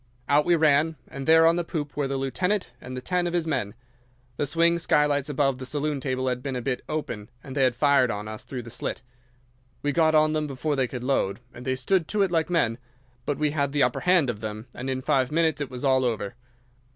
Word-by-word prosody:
Out 145 +1 +4
we 175 - +4
ran, 155 0 +3
and 135 +1 -7
there 160 0 +7
on 165 +1 +4
the 175 - 0
poop 150 -3 -4
were 145 -2 0
the 135 0 -2
lieutenant 180 +9 -1
and 125 0 -7
ten 180 -1 +1
of 175 - -3
his 175 -2 +1
men. 125 -9 -2 0.6
The 145 - 0
swing 170 +3 +3
skylights 150 -3 +2
above 135 -2 +1
the 130 - -6
saloon 150 0 -1
table 130 -1 -2
had 125 -1 -1
been 135 -1 -4
a 125 - -2
bit 125 0 -1
open, 115 -8 -4
and 135 -1 -8
they 140 - +1
had 130 -2 +3
fired 140 -1 +4
on 105 -1 -4
us 110 0 -7
through 125 -3 -6
the 115 - -10
slit. 120 - -4 0.8
We 145 - +1
got 160 +1 +3
on 155 0 +4
them 155 -1 0
before 145 +2 -2
they 130 -2 +1
could 125 0 -6
load, 125 -7 0
and 120 - -10
they 130 - 0
stood 165 +6 +1
to 210 -1 +1
it 190 - 0
like 165 -1 +1
men; 125 -10 +1 0.5
but 145 - 0
we 150 -1 +1
had 140 -2 -1
the 145 - +3
upper 125 0 +1
hand 180 -5 +3
of 105 - -10
them, 110 0 -5
and 130 +2 -5
in 130 0 -2
five 130 0 +1
minutes 160 -2 +1
it 140 - -3
was 125 +1 -5
all 130 -1 +3
over. 110 -5 -1
140 Hz, 240 wpm, -26 LUFS, 125-155 Hz, 0.8 s, there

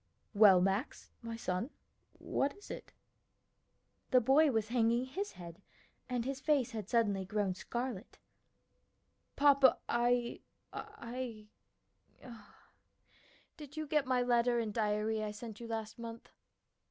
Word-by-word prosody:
"Well, 200 -4 +7
Max, 195 +8 -1
my 230 -1 -5
son, 205 +1 -2 0.5
what 280 +7 -1
is 410 - -11
it?" - - -8 1.2
The 255 - +6
boy 275 +6 +5
was 220 -4 0
hanging 235 +1 +2
his 390 +11 -4
head 170 0 -10 0.5
and 245 -2 -1
his 270 0 -3
face 280 -6 +2
had 215 -3 -6
suddenly 205 -5 +2
grown 195 0 -1
scarlet, 235 +2 -5 1.2
"Papa, 280 -2 +6
I 240 0 +1 0.3
I 230 -3 -7 2.1
Did 295 -1 -11
you 310 - -2
get 295 -2 +1
my 255 -1 +2
letter 240 0 +3
and 225 -3 -1
diary 215 0 0
I 210 - -2
sent 210 0 -8
you 235 - -7
last 225 0 -5
month?" 230 0 -8
235 Hz, 125 wpm, -34 LUFS, 215-255 Hz, 2.1 s, Well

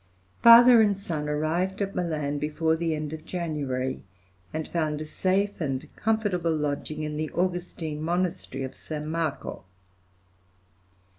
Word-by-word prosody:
Father 235 0 +9
and 205 -3 +3
son 155 -6 -3
arrived 165 +6 -1
at 200 -1 -2
Milan 150 -5 -2
before 160 +2 0
the 165 -1 -1
end 150 0 -4
of 155 -1 -7
January, 140 -8 -3 0.5
and 155 0 -3
found 155 -3 -1
a 155 - -4
safe 190 +5 0
and 135 -4 -3
comfortable 200 -7 0
lodging 150 +1 -2
in 150 0 -3
the 155 0 -2
Augustine 175 -4 -2
monastery 170 -5 -2
of 130 - -6
San 150 -1 -6
Marco. 160 - -3
160 Hz, 135 wpm, -27 LUFS, 150-180 Hz, 0.5 s, Father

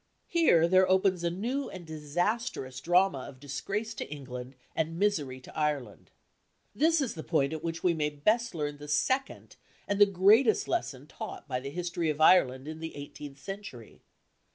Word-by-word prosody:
Here 245 - +4
there 185 +1 +4
opens 185 -1 +3
a 170 - +2
new 240 +11 -2
and 185 -2 -9
disastrous 160 - -2
drama 175 -1 +3
of 130 - -14
disgrace 200 - -4
to - - -6
England 130 -2 -7 0.2
and 160 +1 -1
misery 155 -10 0
to - - -14
Ireland. 145 -8 -2 0.6
This 320 +7 +3
is 265 - -1
the 160 - -6
point 155 -3 +1
at 160 0 -5
which 165 0 -4
we 180 - +4
may 150 -2 0
best 215 +9 0
learn 145 -2 -3
the 150 - -9
second 260 - -1 0.3
and 200 0 0
the 205 - +9
greatest 205 +5 +4
lesson 140 - -2
taught 155 - -8
by 130 -3 -2
the 135 +2 -6
history 170 +1 -2
of 150 0 -2
Ireland 135 -5 +5
in 155 0 -6
the 160 0 -6
eighteenth 145 0 -9
century. 170 - -9
165 Hz, 175 wpm, -29 LUFS, 145-200 Hz, 0.6 s, the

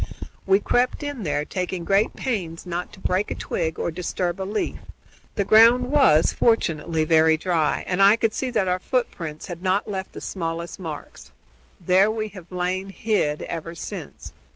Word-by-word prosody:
We 195 +1 +5
crept 250 +7 +1
in 290 -4 -4
there, 145 -4 -1
taking 180 -1 -3
great 200 +3 +2
pains 180 -11 -3
not 175 0 -4
to - - -13
break 190 +2 0
a - - -3
twig 160 -2 -3
or - - -2
disturb 180 +2 -3
a 190 - -3
leaf. 210 - -2 0.6
The 200 - 0
ground 230 +5 +6
was, 265 - +5
fortunately, 165 -8 +1
very 160 0 +4
dry, 165 -2 0
and 185 +1 0
I 200 +2 +7
could 225 -1 0
see 260 - -2
that 215 -6 0
our 180 0 +1
footprints 175 - -3
had 175 -2 -7
not 190 +2 +1
left 190 -2 -5
the - - -7
smallest 170 -1 -4
marks. 160 -5 -8 0.5
There 190 +3 +4
we 215 0 -2
have 185 -3 -13
lain 185 +2 -2
hid 195 -8 -1
ever 165 0 -6
since. - - -8
185 Hz, 175 wpm, -23 LUFS, 165-210 Hz, 0.6 s, I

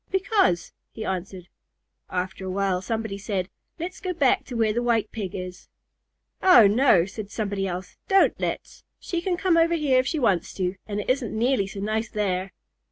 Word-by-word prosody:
"Because," 380 - +1 0.2
he 220 - -7
answered. 185 -1 -4 0.6
After 185 +1 -3
a 190 - -4
while 190 -1 0
somebody 220 0 -3
said, 195 -2 -2 0.3
"Let's 355 +3 -5
go 370 -2 -2
back 285 -7 +2
to 250 - -7
where 220 -2 +2
the 240 - 0
White 230 -3 +1
Pig 200 -5 -5
is." 180 -1 -7 0.7
"Oh, 305 - +8
no," 205 -4 +5
said 205 +1 -7
somebody 200 -2 -2
else, 180 0 -6
"don't 390 -1 +5
let's! - - -4 0.2
She 345 -1 -3
can 355 0 -1
come 365 -2 +2
over 335 +1 +4
here 285 -5 +3
if 255 - 0
she 320 - -1
wants 200 - +1
to, 185 0 -1
and 205 -1 -3
it - - -9
isn't 250 -4 -2
nearly 235 -3 +2
so 195 0 -7
nice 220 +2 -1
there." 195 -2 -1
215 Hz, 185 wpm, -25 LUFS, 190-265 Hz, 0.7 s, Oh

